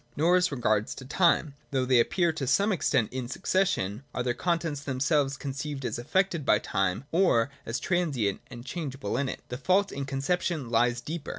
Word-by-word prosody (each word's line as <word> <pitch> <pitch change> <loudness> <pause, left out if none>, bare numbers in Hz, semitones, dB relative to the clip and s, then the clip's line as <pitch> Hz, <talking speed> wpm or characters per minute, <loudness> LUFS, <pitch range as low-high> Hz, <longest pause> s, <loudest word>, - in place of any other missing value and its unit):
Nor 170 +4 +4
as 180 -2 +2
regards 110 -5 0
time, 150 +2 +2 0.2
though 130 -2 0
they 125 -1 +4
appear 170 +7 +2
to 140 -4 -3
some 200 - +3
extent 125 - +1
in 130 -2 -3
succession, 130 - 0
are 125 - 0
their 120 -1 0
contents 165 -2 -1
themselves 140 0 0
conceived 140 0 -5
as 115 -1 -2
affected 170 +5 0
by - - +4
time, 95 +4 -1
or 150 -9 +3 0.2
as 115 - -2
transient 145 - 0
and 120 -1 -10
changeable 140 -6 -4
in 130 +1 0
it. - - -6
The 125 - -5
fault 190 +6 +2
in 140 0 -4
conception 140 0 -1
lies 120 +1 +2
deeper. 155 +4 -5
140 Hz, 180 wpm, -28 LUFS, 125-170 Hz, 0.2 s, Nor